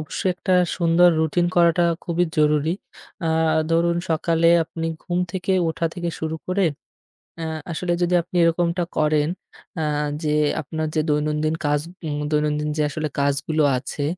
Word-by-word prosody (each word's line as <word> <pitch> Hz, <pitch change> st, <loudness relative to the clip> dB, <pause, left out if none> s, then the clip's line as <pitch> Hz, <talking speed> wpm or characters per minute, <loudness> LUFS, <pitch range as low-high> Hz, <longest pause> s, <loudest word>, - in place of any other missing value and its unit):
অবশ্যই 170 Hz, +4 st, -2 dB
একটা 185 Hz, +1 st, 0 dB, 0.2 s
সুন্দর 170 Hz, 0 st, +5 dB
routine 175 Hz, +2 st, +1 dB
করাটা 170 Hz, 0 st, +4 dB, 0.2 s
খুবই 175 Hz, +1 st, +1 dB
জরুরি। 150 Hz, +2 st, +2 dB, 0.5 s
আ -, -, +1 dB, 0.4 s
ধরুন 170 Hz, +1 st, +2 dB
সকালে 165 Hz, +1 st, +2 dB, 0.2 s
আপনি 165 Hz, +1 st, -5 dB, 0.2 s
ঘুম 175 Hz, 0 st, -2 dB
থেকে 190 Hz, 0 st, -1 dB, 0.2 s
ওঠা 165 Hz, +1 st, -1 dB
থেকে 175 Hz, -1 st, -3 dB
শুরু 160 Hz, 0 st, -3 dB
করে, 185 Hz, +2 st, +1 dB, 0.8 s
আ -, -, -3 dB, 0.3 s
আসলে 175 Hz, +1 st, -1 dB
যদি 175 Hz, 0 st, +1 dB
আপনি 175 Hz, +2 st, -13 dB
এরকমটা 170 Hz, +1 st, +1 dB
করেন, 150 Hz, 0 st, +2 dB, 0.5 s
আ -, -, 0 dB, 0.4 s
যে 150 Hz, -1 st, +1 dB, 0.3 s
আপনার 155 Hz, +2 st, -4 dB
যে 155 Hz, -, +3 dB
দৈনন্দিন 150 Hz, +1 st, 0 dB
কাজ, 145 Hz, 0 st, +2 dB, 0.3 s
উম 145 Hz, -1 st, -2 dB
দৈনন্দিন 150 Hz, 0 st, 0 dB
যে 150 Hz, -, +1 dB
আসলে 155 Hz, +1 st, -3 dB
কাজগুলো 140 Hz, +2 st, +1 dB
আছে। 135 Hz, +3 st, -5 dB
160 Hz, 150 wpm, -22 LUFS, 150-175 Hz, 0.8 s, সুন্দর